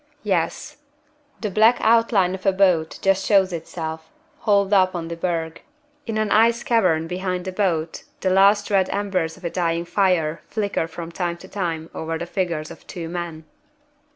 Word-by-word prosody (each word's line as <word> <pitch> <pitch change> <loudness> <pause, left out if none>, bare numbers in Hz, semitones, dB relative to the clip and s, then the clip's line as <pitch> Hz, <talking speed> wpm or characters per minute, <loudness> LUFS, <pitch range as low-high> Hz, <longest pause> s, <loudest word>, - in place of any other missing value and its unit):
Yes! 210 - -1 0.6
The 210 -3 -2
black 220 +5 +5
outline 225 -5 +3
of 190 +1 -5
a - - +6
boat 185 -4 +2
just 195 0 +2
shows 190 -3 +3
itself, 160 -1 -6 0.3
hauled 200 -1 +2
up 185 -2 +4
on 165 -1 -4
the 170 - -4
berg. 165 -2 -3 0.5
In 225 -1 -2
an 215 -1 0
ice 230 +2 +4
cavern 180 -9 +2
behind 180 +1 -3
the 190 - -3
boat 170 -5 -1 0.2
the 185 - +1
last 200 +2 +4
red 190 -2 +3
embers 185 -5 -1
of - - -18
a 170 - -3
dying 170 -1 -1
fire 170 -4 +1
flicker 205 -6 -2
from 165 0 -8
time 170 0 -3
to 190 - -13
time 165 -5 -4
over 160 0 -3
the 170 - -4
figures 170 -4 -3
of - - -13
two 165 -2 -6
men. 170 -2 -5
185 Hz, 175 wpm, -22 LUFS, 165-200 Hz, 0.6 s, a